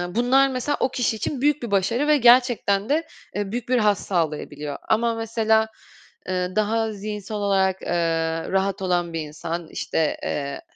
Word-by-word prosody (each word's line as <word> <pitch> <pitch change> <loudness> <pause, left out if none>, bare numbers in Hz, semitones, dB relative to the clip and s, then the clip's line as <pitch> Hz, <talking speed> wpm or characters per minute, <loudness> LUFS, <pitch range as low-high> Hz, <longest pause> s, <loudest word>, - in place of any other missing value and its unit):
bunlar 260 +3 +4
mesela 265 +3 -1
o - - +2
kişi 245 -3 0
için 245 +5 -3
büyük 295 -1 +2
bir 235 - -4
başarı 215 +8 +1
ve 300 0 +5
gerçekten 240 -5 +4
de, 320 +3 +1 0.3
eee, 205 -1 -2
büyük 240 +1 -4
bir 255 - +3
haz 210 -3 +3
sağlayabiliyor. 150 -4 -3
Ama 230 +1 +2
mesela, 220 -1 +1 0.6
eee, 180 0 -2
daha 220 +1 +1
zihinsel 210 0 -5
olarak, 190 -2 +1
eee, - - -6 0.6
rahat 195 +1 0
olan 175 -2 0
bir 165 - -2
insan, 160 +2 -5
işte, 160 -2 -1
eee, 140 -1 -3
210 Hz, 160 wpm, -23 LUFS, 185-240 Hz, 0.6 s, ve